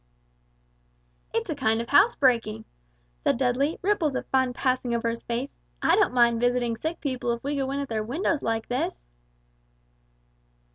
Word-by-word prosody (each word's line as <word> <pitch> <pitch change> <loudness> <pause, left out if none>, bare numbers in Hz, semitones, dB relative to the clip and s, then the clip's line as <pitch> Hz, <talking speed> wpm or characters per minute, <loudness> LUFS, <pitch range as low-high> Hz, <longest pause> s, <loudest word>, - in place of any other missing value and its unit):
"It's - - -2
a - - -2
kind 220 +1 +1
of 235 - -5
housebreaking," 255 - +3 0.6
Dudley 260 +4 +1
said, - - -13
ripples 345 -8 +1
of - - -3
fun 260 -1 +2
passing 255 -1 0
over 230 0 0
his 230 0 -6
face; 240 +4 -4 0.2
"I - - +3
don't 415 - +3
mind 235 -2 +3
visiting 245 -1 +1
sick 320 +9 -4
people 255 -4 -2
if 235 - -7
we 285 +2 -2
go 270 -1 -1
in 275 +1 -2
at 280 - -3
their 220 -3 -2
windows 295 - -1
like 225 0 -2
this!" 245 - -2
250 Hz, 160 wpm, -26 LUFS, 235-280 Hz, 0.6 s, housebreaking